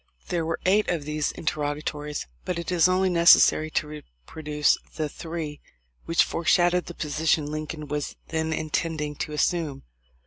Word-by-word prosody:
There 170 -2 0
were 165 - -2
eight 205 +3 +3
of 165 -5 -1
these 150 0 -1
interrogatories, 150 -1 -3 0.2
but 180 - -3
it 170 +1 -4
is 175 -1 +5
only 185 +1 +2
necessary 170 -2 +6
to 155 0 -1 0.4
reproduce 150 - +1 0.2
the 155 -2 -1
three 160 -1 -6 0.4
which 165 - +4
fore 170 - -4
shadow 175 +2 +4
the 175 - -10
position 155 0 0
Lincoln 155 0 -5
was 150 0 -3
then 160 0 -1
intending 155 -1 -2
to 150 - -4
assume. 150 -2 -1
155 Hz, 150 wpm, -25 LUFS, 150-170 Hz, 0.4 s, necessary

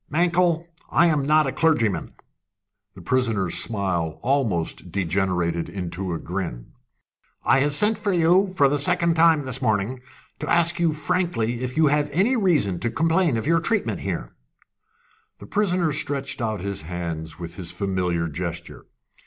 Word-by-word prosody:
Mankell, 170 +1 +2 0.2
I 170 - +4
am 150 -5 +1
not 155 0 +4
a 135 - -1
clergyman." 120 - 0 0.8
The 95 - -12
prisoner's 115 -6 0
smile 95 -7 -1
almost 105 -11 -1
degenerated 90 -2 -1
into 95 -1 -4
a - - -2
grin. 85 -10 -5 0.7
"I - - +4
have 145 +1 +1
sent 210 +6 +3
for 205 -1 -1
you, 180 +3 +4
for 140 - +5
the 145 +1 0
second 170 +4 +2
time 160 -2 +4
this 130 0 -3
morning, 110 +2 0 0.4
to - - -4
ask 170 +1 +3
you 170 -2 +3
frankly 145 -6 -1
if 125 +3 -4
you 160 - +5
have 150 0 +2
any 200 - +2
reason 155 - +1
to 120 - -1
complain 165 +1 +1
of 110 - -3
your 165 +2 +3
treatment 220 +5 -1
here?" - - -3 1.1
The - - -12
prisoner 180 -6 +1
stretched 140 -2 -3
out 110 -4 -2
his 100 -2 -3
hands 80 -1 -5
with 85 -1 -7
his 90 -3 -6
familiar 90 -4 -1
gesture. 85 +2 -6
130 Hz, 155 wpm, -23 LUFS, -, 1.1 s, for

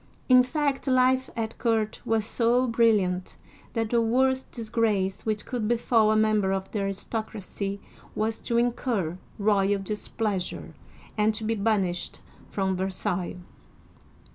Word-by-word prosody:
In 255 -1 +8
fact 280 +1 -1
life 255 0 +3
at 225 -1 -4
court 220 -2 0
was 225 -2 +1
so 240 +2 +2
brilliant, 210 -6 +2 0.4
that 225 -2 -1
the 235 -1 +3
worst 260 +3 +1
disgrace 220 -4 -1
which 215 -1 -1
could 240 -4 -2
befall 230 -2 +3
a - - +3
member 215 -3 +3
of 195 0 -3
the 210 - -2
aristocracy 200 0 -4 0.4
was 220 +1 -1
to 235 - -1
incur 230 -7 0 0.2
royal 200 -1 +2
displeasure 200 -1 -3 0.5
and 215 +1 +3
to 220 - -3
be 220 +1 0
banished 200 -5 -1 0.3
from 190 -1 -1
Versailles. 185 -1 -2
220 Hz, 130 wpm, -26 LUFS, 195-235 Hz, 0.5 s, In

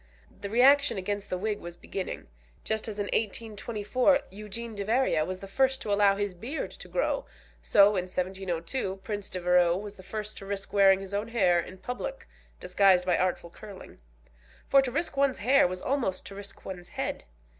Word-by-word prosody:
The 200 - -4
reaction 275 +4 +5
against 200 +2 -3
the 185 - -1
wig 210 +2 -2
was 175 0 -9
beginning. 190 +1 -5 0.4
Just 220 0 -2
as 215 -2 -5
in 205 - -1
1824 225 +5 0
Eugene 215 +3 -6
Deveria 205 -5 +1
was 185 0 -5
the 195 - -7
first 265 +6 +2
to 205 - 0
allow 200 -1 +4
his 205 -1 -2
beard 235 - -5
to - - -11
grow, - - -1 0.3
so 200 0 +6
in 190 -3 -1
1702 185 +3 -2
Prince 205 -2 -4
Devereux 180 -1 +3
was 205 +1 -7
the - - -11
first 215 +2 -6
to 195 - -10
risk 195 -1 -5
wearing 195 -1 +5
his 195 0 -8
own 205 +2 -1
hair 190 -7 +3
in 185 +2 -6
public 250 - -6 0.3
disguised 180 0 +4
by 180 - +3
artful 180 -2 -1
curling. 205 -1 -12 0.7
For 275 - +6
to 260 -2 -3
risk 290 +2 -2
one's 275 -1 +2
hair 255 +1 +4
was 180 0 -6
almost 250 -9 -1
to - - -8
risk 200 0 -10
one's 180 -2 -7
head. - - -4
200 Hz, 180 wpm, -28 LUFS, 185-230 Hz, 0.7 s, so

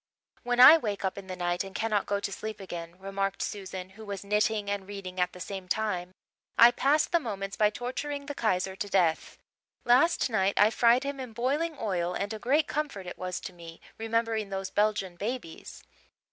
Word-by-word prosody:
"When 245 0 -1
I 275 +6 +11
wake 205 -6 -3
up 190 - -1
in 195 -1 -9
the 185 - -5
night 175 0 -1
and 195 +1 -10
cannot 215 -3 0
go 200 0 0
to 200 - -4
sleep 215 +2 -6
again," 170 -2 -7
remarked 195 0 -2
Susan, 190 -2 -6
who 220 +3 -12
was 200 -2 -6
knitting 210 0 +1
and 200 -1 -3
reading 190 -2 -7
at 180 0 +1
the 180 - -12
same 190 +1 -6
time, 185 -2 -2 0.4
"I 235 +1 +9
pass 285 +5 +2
the 340 - +1
moments 200 -7 -5
by 210 -1 +4
torturing 280 +5 -4
the 290 - -5
Kaiser 190 -6 0
to 205 +1 -4
death. 175 -5 +1 0.5
Last 260 +8 +4
night 200 -4 +1
I 210 +1 +6
fried 240 +3 +4
him 280 0 -4
in 255 -3 -7
boiling 285 +7 -1
oil 180 -4 -1
and 205 +2 -2
a 215 - -6
great 285 +7 +2
comfort 290 -11 -3
it 180 - -8
was 185 -1 -3
to 185 - -7
me, 170 -1 -11 0.2
remembering 225 -2 -1
those 195 -1 -4
Belgian 205 -4 0
babies." 210 -5 -6
205 Hz, 200 wpm, -28 LUFS, 190-235 Hz, 0.5 s, I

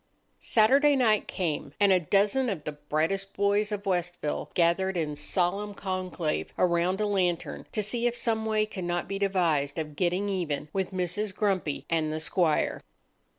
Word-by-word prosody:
Saturday 275 +6 +4
night 225 -5 +2
came, 165 -5 -3
and 200 -1 +5
a 185 - +4
dozen 205 - +2
of 180 -8 -3
the 150 - -3
brightest 155 +7 -2
boys 205 +1 +2
of 205 -1 -4
Westville 175 -4 -1
gathered 180 +2 +2
in 150 -3 -2
solemn 195 +6 -1
conclave 185 -5 -3
around 180 +2 +2
a 215 - +1
lantern 185 -4 -1
to 215 - 0
see 235 +3 0
if 240 0 -2
some 225 -2 0
way 215 -1 +2
could 200 -3 -7
not 175 0 -2
be 195 0 -3
devised 170 -8 +1
of 150 -2 -4
getting 180 +4 0
even 160 -7 -2
with 190 -1 -1
Mrs. 190 +2 -2
Grumpy 190 -8 -1
and 160 -2 0
the 155 - -2
squire. 160 -1 +1
185 Hz, 165 wpm, -28 LUFS, 170-205 Hz, -, and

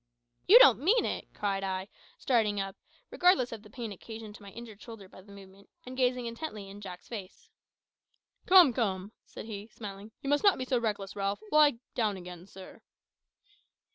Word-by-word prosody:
"You 430 - +10
don't - - +8
mean 415 - +3
it!" - - -4
cried 195 -1 -2
I, 190 0 -3 0.3
starting 220 -5 +1
up, 195 0 -4 0.4
regardless 355 -9 +3
of 225 -2 -7
the 210 - -16
pain 235 -4 -6
occasioned 220 +2 -9
to 210 - -14
my 200 - -11
injured 220 -1 -11
shoulder 225 -5 -11
by 185 - -15
the 200 +2 -17
movement, 195 0 -15 0.2
and 255 +1 -8
gazing 250 -1 +1
intently 230 -4 -6
in 205 +1 -11
Jack's 185 -3 -9
face. 230 - -9 1.0
"Come, 360 -8 +8
come," 200 -4 -2 0.2
said - - -9
he, 210 -1 -7
smiling; 205 -1 -9
"you - - -5
must 290 - +2
not 400 -2 +5
be 255 - -3
so 255 -1 +1
reckless, 205 -4 -3
Ralph. 200 - -2
Lie 300 -5 +5 0.2
down 215 -4 0
again, 180 0 -10
sir." 190 -1 -13
215 Hz, 180 wpm, -30 LUFS, 195-250 Hz, 1.0 s, You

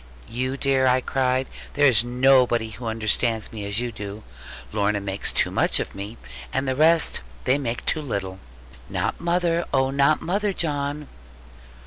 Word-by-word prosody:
'You 130 +3 -3
dear,' 135 -1 +2
I 125 0 +4
cried, 130 0 0 0.3
'there 145 +1 +4
is 115 -3 +4
nobody 125 -2 +3
who 115 +2 -7
understands 110 0 0
me 105 -3 -6
as 100 +2 -1
you 120 0 -2
do. 105 0 -7 0.5
Lorna 105 0 +1
makes 100 0 -3
too - - +1
much - - +2
of - - -4
me, 100 +4 -7 0.3
and 135 +1 -1
the 130 - 0
rest 160 +3 +3 0.2
they 135 +3 +2
make 120 -3 -3
too 155 - 0
little.' 95 -9 -4 0.5
'Not - - -2
mother; 170 0 +1
oh, 135 0 +2
not 140 +2 +3
mother, 200 +3 -1
John!' 145 -3 -2
130 Hz, 160 wpm, -24 LUFS, 110-140 Hz, 0.5 s, I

